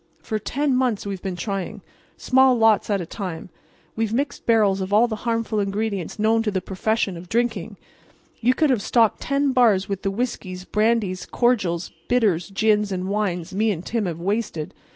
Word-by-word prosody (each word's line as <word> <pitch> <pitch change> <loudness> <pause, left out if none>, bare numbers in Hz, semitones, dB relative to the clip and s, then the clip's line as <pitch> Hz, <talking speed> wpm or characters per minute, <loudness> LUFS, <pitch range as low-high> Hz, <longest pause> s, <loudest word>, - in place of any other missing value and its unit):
For 215 -2 -2
ten 275 +5 0
months 250 -6 0
we've 195 -2 -4
been 190 -2 -4
trying. 195 +2 -4 0.3
Small 260 -1 +4
lots 225 -2 +3
at 200 -2 +1
a - - -4
time, 180 -2 -6 0.5
we've 225 -1 -1
mixed 275 +5 -2
barrels 210 -4 +3
of 190 +1 -4
all 220 +4 +5
the 220 -2 -4
harmful 230 -2 0
ingredients 200 -2 -2
known 220 +1 +2
to 225 - 0
the 195 -2 -1
profession 195 +1 -1
of 170 +1 -11
drinking. 225 -4 -1 0.6
Ye 245 +2 +3
could 300 +1 +2
have 240 -5 +1
stocked 225 0 +2
ten 275 0 +1
bars 225 -7 +3
with 195 -2 -3
the 195 - 0
whiskies, 195 -4 -4
brandies, 210 -4 0
cordials, 195 -9 0 0.2
bitters, 205 -9 +2
gins 210 0 +2
and 185 0 -3
wines 195 -3 -2
me 215 +3 +1
and 180 -4 -3
Tim 225 -4 -1
have 170 -2 -4
wasted. 195 -4 -2
210 Hz, 180 wpm, -23 LUFS, 190-230 Hz, 0.6 s, all